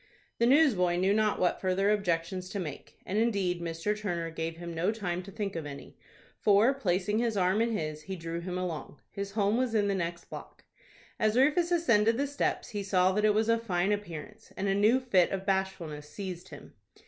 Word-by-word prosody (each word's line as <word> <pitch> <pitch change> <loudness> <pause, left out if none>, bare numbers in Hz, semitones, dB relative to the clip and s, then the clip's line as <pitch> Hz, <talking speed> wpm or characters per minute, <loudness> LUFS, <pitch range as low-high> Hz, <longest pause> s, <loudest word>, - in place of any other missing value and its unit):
The 235 - +4
newsboy 240 - +4
knew 190 +3 +2
not 215 0 +1
what 180 - +1
further 195 +2 +2
objections 185 -2 -1
to 200 - -4
make, 150 -6 -7
and, 205 +3 -1
indeed, 195 -6 0
Mr. 165 +5 -2
Turner 175 -6 -3
gave 165 0 -4
him 170 0 -6
no 170 +5 +1
time 180 -5 -3
to 195 +2 -11
think 200 -2 -4
of 160 -3 -4
any, 140 -1 -10 0.4
for, 210 +5 +4
placing 205 -4 0
his 230 -3 0
arm 190 +3 +2
in 230 -1 +1
his, 155 -1 -4
he 190 +4 -6
drew 165 -1 -5
him 180 +1 -4
along. 170 -5 -5
His 200 -1 -5
home 210 +1 +2
was 250 -3 0
in 205 -2 +3
the 200 - +1
next 170 -2 -3
block. - - -10 0.6
As 215 +1 +2
Rufus 305 +6 +3
ascended 230 -10 +3
the 280 - +1
steps, 285 0 -2
he 205 -3 -3
saw 185 -2 +3
that 210 +2 +1
it 210 -1 +4
was 220 +1 +2
of 230 0 +2
fine 190 -3 0
appearance, 175 -8 -5
and 200 - -1
a 195 - +2
new 215 +6 +4
fit 195 -9 +3
of 195 0 -4
bashfulness 185 -6 -2
seized 185 -2 -7
him. - - -12
195 Hz, 205 wpm, -29 LUFS, 175-215 Hz, 0.6 s, The